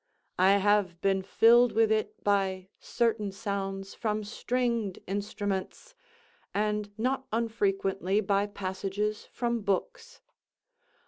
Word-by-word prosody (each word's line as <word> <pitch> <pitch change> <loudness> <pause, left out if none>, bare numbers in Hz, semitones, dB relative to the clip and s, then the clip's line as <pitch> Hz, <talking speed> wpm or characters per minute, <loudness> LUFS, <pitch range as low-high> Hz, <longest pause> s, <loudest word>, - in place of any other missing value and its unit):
I 190 +2 +6
have 200 -3 +2
been 195 -1 +2
filled 235 +5 +5
with 225 0 +3
it 215 0 -1
by 190 -2 0
certain 225 -4 0
sounds 195 -1 -4
from 215 -1 -2
stringed 235 -2 -1
instruments, 200 - -4 0.6
and 210 0 0
not 260 +4 -1
unfrequently 200 -3 0
by 200 0 +1
passages 200 +2 -3
from 235 -2 -1
books. 205 - -3
205 Hz, 105 wpm, -29 LUFS, 195-225 Hz, 0.6 s, I